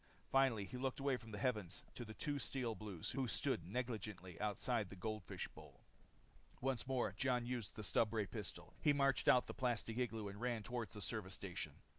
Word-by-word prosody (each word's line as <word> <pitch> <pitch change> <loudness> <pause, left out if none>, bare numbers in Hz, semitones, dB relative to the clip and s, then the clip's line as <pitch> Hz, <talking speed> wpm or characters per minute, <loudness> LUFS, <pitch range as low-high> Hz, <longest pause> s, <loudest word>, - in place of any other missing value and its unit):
Finally 130 -7 +5
he 125 - -5
looked 130 +1 -1
away 135 -1 +3
from 115 -2 -8
the 105 - -4
heavens 105 -6 0
to 120 - -4
the 110 -1 -8
two 145 -1 0
Steel 125 -4 0
Blues 105 -6 -4
who 130 0 0
stood 130 - +1
negligently 105 -5 -3
outside 105 +1 +1
the - - -7
goldfish 110 +1 -3
bowl. - - -13 0.8
Once 130 -2 0
more, 125 -6 +1
Jon 125 +1 +2
used 120 -4 -2
the 110 - -5
stubray 110 +1 +3
pistol. 90 - -5
He 145 - +6
marched 140 -2 +3
out 125 - +8
of - - -19
the - - -5
plastic 120 -2 0
igloo 115 -4 0
and 100 +2 -7
ran 120 -3 0
toward 120 -2 -2
the 105 - -7
service 100 -4 -1
station. 90 -6 -4
115 Hz, 195 wpm, -41 LUFS, 105-125 Hz, 0.8 s, out